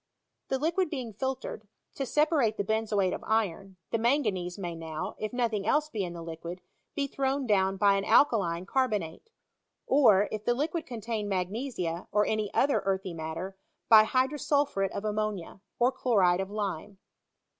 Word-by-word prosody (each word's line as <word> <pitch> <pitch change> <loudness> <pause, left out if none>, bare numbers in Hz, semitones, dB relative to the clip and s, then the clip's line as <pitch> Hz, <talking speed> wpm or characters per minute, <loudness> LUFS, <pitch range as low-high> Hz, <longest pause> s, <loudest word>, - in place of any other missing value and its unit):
The 265 - 0
liquid 335 +5 0
being 255 -7 -5
filtered, 260 -2 -4 0.3
to 270 - -3
separate 295 -8 +2
the - - 0
benzoate 210 -2 0
of - - -5
iron, 195 -3 -1
the 230 - +1
manganese 215 -8 0
may 175 -4 -4
now 165 +3 -5
(if 215 - -3
nothing 230 -5 -1
else 300 +5 +2
be 210 -3 -2
in 175 -2 -4
the 170 -1 -7
liquid) 170 +2 -7 0.3
be 280 - 0
thrown 275 0 -1
down 195 -3 +2
by 200 +1 +5
an 195 - -2
alkaline 185 -10 +3
car 260 +5 +1
bonate; 190 - -4 0.6
or, 215 -8 +5
if 215 -1 -4
the 240 +2 +1
liquid 320 +5 -2
contain 225 -3 -4
magnesia, 185 -2 -3
or 210 0 +3
any 215 -1 -1
other 280 +1 +2
earthy 190 -2 -1
matter, 165 +4 -5 0.3
by 220 -1 +9
hydrosulphuret 265 -4 +1
of 200 - -5
ammonia, 210 -3 -3 0.2
or 245 +2 +3
chloride 195 -9 +2
of 190 - -4
lime. 205 -2 -4
210 Hz, 165 wpm, -29 LUFS, 190-255 Hz, 0.6 s, by